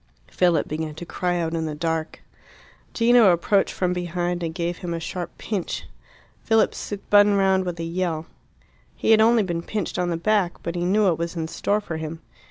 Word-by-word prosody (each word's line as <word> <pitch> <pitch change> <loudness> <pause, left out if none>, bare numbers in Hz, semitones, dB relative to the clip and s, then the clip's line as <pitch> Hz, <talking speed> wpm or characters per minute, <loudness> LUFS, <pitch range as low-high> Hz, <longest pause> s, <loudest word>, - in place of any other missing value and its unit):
Philip 175 -4 +2
began 155 0 -4
to 175 - -7
cry 175 +2 -1
out 165 -1 -2
in 160 -1 -1
the 150 - -4
dark. 160 0 -3 0.7
Gino 230 -3 +5
approached 195 +4 +2
from 180 -1 0
behind 175 0 -2
and 165 -1 -2
gave 170 +1 -3
him 170 -2 -4
a - - -3
sharp 175 +2 -6
pinch. 200 -6 -4 0.6
Philip 225 -1 +3
spun 205 0 +2
round 190 -1 +2
with 175 -2 -4
a - - -2
yell. 165 -1 -2 0.7
He - - +1
had 220 -1 +6
only 225 0 +5
been 170 -3 -2
pinched 205 +1 -3
on 180 -1 0
the 170 - -1
back, 195 0 +1
but 170 - -3
he 175 0 -2
knew 205 +4 +3
what 175 -5 +2
was 170 +1 -3
in 160 -1 -2
store 205 +5 -1
for 170 -6 -5
him. 160 +1 -6
175 Hz, 195 wpm, -23 LUFS, 165-200 Hz, 0.7 s, had